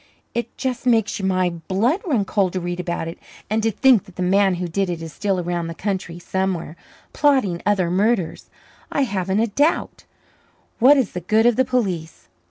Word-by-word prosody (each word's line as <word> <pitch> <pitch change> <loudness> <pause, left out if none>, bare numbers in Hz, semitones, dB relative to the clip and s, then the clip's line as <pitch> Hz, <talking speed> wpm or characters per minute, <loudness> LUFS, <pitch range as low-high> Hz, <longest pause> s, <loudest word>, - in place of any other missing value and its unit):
"It 235 0 -4
just 255 -1 -3
makes 225 -4 +2
my 185 -2 +1
blood 195 - 0
run 240 - +1
cold 195 -3 0
to 185 - -1
read 175 0 -4
about 175 -2 -3
it. 165 - -7 0.3
And 220 +1 +2
to 225 - +2
think 245 -1 +4
that 190 - -16
the 185 - -2
man 190 +1 +3
who 175 0 -3
did 190 +3 -1
it 170 -2 -3
is 165 -2 -8
still 195 -3 -1
around 175 -1 -2
the 165 - -6
country 190 -3 -3
somewhere 180 -2 -2 0.4
plotting 260 - +2
other 190 -4 +2
murders, 195 -1 0 0.4
I 280 - +1
haven't 195 -3 0
a - - +3
doubt. 285 +9 0 0.7
What 270 +5 +7
is 255 -7 +1
the 180 - -5
good 215 +6 +2
of 240 -1 +5
the 260 - +2
police?" 190 -11 -2
195 Hz, 190 wpm, -21 LUFS, 175-230 Hz, 0.7 s, What